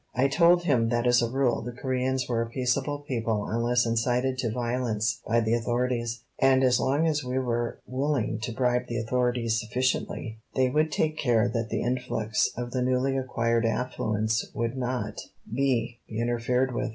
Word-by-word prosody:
I 130 +2 +3
told 170 +5 +4
him 125 -9 +2
that 120 0 0
as 120 0 +5
a 120 - 0
rule 130 -1 +1
the 120 - -5
Coreans 130 0 -1
were 115 -2 0
a 115 - -3
peaceable 135 +4 -1
people 110 -4 -1
unless 120 +2 +1
incited 125 +3 0
to 120 - 0
violence 120 -2 -1
by 115 +1 +3
the 110 0 +1
authorities, 120 0 -1 0.2
and 135 0 +4
as 125 -2 +4
long 140 +5 +1
as 150 -3 +1
we 125 +1 -2
were 120 -2 -1
willing 135 -3 -1
to 120 +2 -4
bribe 125 +1 0
the 120 0 -2
authorities 120 -1 0
sufficiently 120 -1 -2 0.2
they 130 -1 +2
would 155 +2 +2
take 155 0 0
care 120 -5 +3
that 115 -2 -2
the - - -1
influx 115 -3 0
of 120 0 -4
the 130 - -1
newly 130 +2 +1
acquired 115 -3 0
affluence 110 -1 0
would 115 +2 -1
not 125 -4 -3 0.3
be 120 -3 0
interfered 120 +3 0
with. 125 - -1
125 Hz, 175 wpm, -27 LUFS, 115-130 Hz, 0.3 s, as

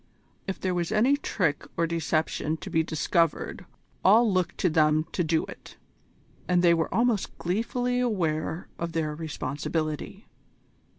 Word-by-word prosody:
If 195 - -3
there 185 -1 -1
was 175 +1 -1
any 235 +6 +4
trick 185 - -1
or 165 - +3
deception 160 -1 -1
to - - -8
be 160 - +3
discovered 165 0 0 0.4
all 215 +2 +5
looked 180 -2 0
to 180 - +3
them 155 -1 +3
to 175 - 0
do 160 0 +1
it, - - -12 0.7
and 180 -1 +3
they 170 -1 +6
were 165 -1 0
almost 230 0 +1
gleefully 245 +7 -1
aware 170 -8 -1
of 170 0 -3
their 155 -2 -1
responsibility. 155 - -4
170 Hz, 140 wpm, -27 LUFS, 160-195 Hz, 0.7 s, they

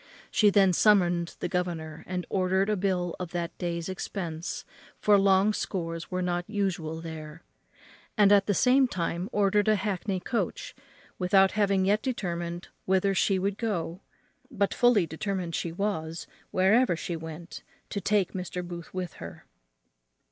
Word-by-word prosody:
She 210 - +5
then 195 -2 +4
summoned 175 -4 +3
the - - 0
governor, 165 -4 -3
and 180 -1 -3
ordered 190 +2 +1
a - - +2
bill 180 -3 -1
of 180 -2 -6
that 170 -1 -3
day's 170 -1 -2
expense, 180 -3 -5 0.3
for 210 - +5
long 195 +1 +4
scores 165 -5 -4
were 185 0 -2
not 175 +1 -2
usual 175 -6 -2
there; 160 0 -8 0.7
and 205 -1 +6
at 200 -1 +5
the 205 - +2
same 260 +4 +4
time 175 -2 -3
ordered 205 0 +2
a 215 - +5
hackney 195 -1 -2
coach, 195 0 -3 0.5
without 190 +1 +4
having 200 -2 +2
yet 205 +2 +2
determined 175 -8 -3 0.2
whither 190 +1 +2
she 195 0 +2
would 195 +2 -1
go, 185 -5 -2 0.5
but 200 0 0
fully 240 -7 +4
determined 175 +2 -3
she 170 - -2
was, 165 -3 -3 0.2
wherever 195 +2 +3
she 170 +1 -4
went, 160 +1 -8 0.3
to 200 - -2
take 200 -1 +1
Mr. 180 -1 -4
Booth 170 -1 -8
with 180 -1 -3
her. - - -9
185 Hz, 150 wpm, -28 LUFS, 170-200 Hz, 0.7 s, and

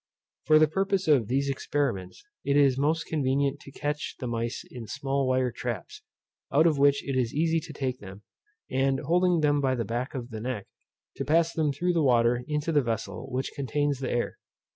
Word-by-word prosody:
For 155 - +6
the 155 0 +6
purpose 195 +3 0
of 135 -8 +4
these 135 +3 0
experiments 135 - -2 0.2
it 140 0 +2
is 140 -3 +5
most 155 +4 +1
convenient 140 -1 0
to 140 - -13
catch 145 +2 -3
the 130 - -4
mice 115 0 -3
in 120 -3 -8
small 135 +3 -1
wire 130 -1 +1
traps, 115 -5 -5 0.5
out 155 +4 +4
of 155 -4 +3
which 140 0 +3
it 135 - -1
is 125 -2 0
easy 165 +2 +2
to 155 - -9
take 130 -3 -3
them, 100 +1 -11 0.5
and 135 +1 +1
holding 175 +2 +2
them 145 -1 +3
by 130 -1 +1
the 115 -2 -2
back 120 +6 -3
of 125 -1 -5
the 110 -1 -6
neck, 120 -4 -3 0.5
to - - -2
pass 165 +4 +2
them 155 -3 +1
through 175 +6 0
the 165 - +2
water 120 -2 +3
into 150 +2 -1
the 150 -2 +4
vessel 110 -1 -4
which 130 +1 -2
contains 145 0 -1
the 135 - -3
air. 120 - -2
135 Hz, 200 wpm, -27 LUFS, 125-150 Hz, 0.5 s, For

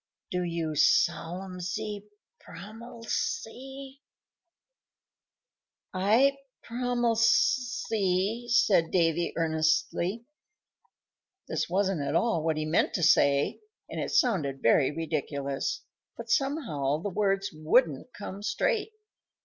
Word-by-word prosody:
Do 180 - -1
you 170 -2 -2
solemsy 185 +6 0 0.3
promilse?" 230 - -5 2.5
"I 225 +9 +3 0.3
prolemse," 240 0 +1 0.6
said 195 -8 +3
Davy, 170 -1 +1
earnestly. 165 +6 0 1.2
This - - -2
wasn't 190 -2 0
at 140 - -2
all 225 -9 +2
what 160 -1 0
he 155 - -1
meant 155 +3 +1
to 175 - -1
say, 140 -2 +3 0.3
and - - -3
it - - -3
sounded 175 - +1
very 130 +4 +4
ridiculous; 140 -3 -3 0.4
but 235 0 -6
somehow 230 - 0
the 205 - -1
words 195 0 0
wouldn't 155 - +1
come 200 -1 -7
straight. 440 - -1
185 Hz, 95 wpm, -28 LUFS, 160-230 Hz, 2.5 s, very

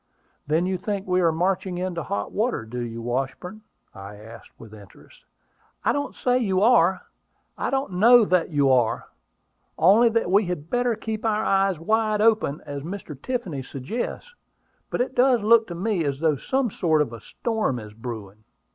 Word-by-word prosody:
"Then 160 +4 +1
you 185 -1 -2
think 200 -1 -3
we 185 0 +1
are 170 -2 +3
marching 180 +2 -1
into 180 -2 -3
hot 100 -8 -4
water, 215 - -1
do 120 +3 -6
you, 115 -1 -5
Washburn?" 135 - -4 0.3
I 100 +1 -10
asked 110 +2 -13
with 110 -2 -13
interest. 100 -3 -16 0.6
"I - - +4
don't 285 0 -3
say 250 0 +1
you 195 -6 +1
are: 190 -6 +4 0.5
I - - -2
don't 270 -6 -1
know 225 +5 +6
that 180 -3 +1
you 145 -4 +2
are: 120 -3 +1 0.7
only 215 +7 +5
that 225 -5 0
we 200 +2 +4
had 170 -3 -5
better 245 -1 +1
keep 220 0 -5
our 215 -1 0
eyes 195 -2 +2
wide 215 +5 0
open, 215 -9 +2
as 145 -1 -6
Mr. 170 -1 -7
Tiffany 180 - -4
suggests. 220 - -5 0.6
But - - -1
it 255 - -2
does 250 -3 +3
look 230 +1 +5
to 175 - -6
me 190 -1 -1
as 140 -2 -2
though 160 -2 +2
some 260 - -1
sort 160 -5 +2
of 120 - -9
a 115 - -9
storm 220 - -2
is 105 -2 -9
brewing." 110 -3 -8
180 Hz, 180 wpm, -24 LUFS, 135-220 Hz, 0.7 s, know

